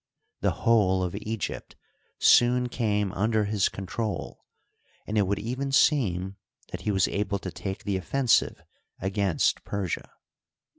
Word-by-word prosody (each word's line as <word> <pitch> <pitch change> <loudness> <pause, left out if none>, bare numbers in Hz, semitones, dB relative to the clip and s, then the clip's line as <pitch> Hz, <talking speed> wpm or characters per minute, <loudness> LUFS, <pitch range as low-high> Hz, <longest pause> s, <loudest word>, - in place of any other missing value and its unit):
The - - -2
whole 95 -5 +4
of 90 -1 -3
Egypt 110 -2 -5 0.4
soon 125 +1 +4
came 105 -5 0
under 110 +2 +1
his 100 -1 +1
control, 100 +3 -5 0.6
and 105 - -4
it 105 -3 +3
would 100 +1 0
even 125 +6 -3
seem 100 - +2 0.3
that - - -6
he 105 - -1
was 95 -2 +2
able 100 0 -1
to 95 -2 -6
take 95 +2 -6
the 100 -2 -1
offensive 120 +8 +1 0.4
against 95 -2 0
Persia. 100 -5 -3
105 Hz, 135 wpm, -27 LUFS, 95-115 Hz, 0.6 s, whole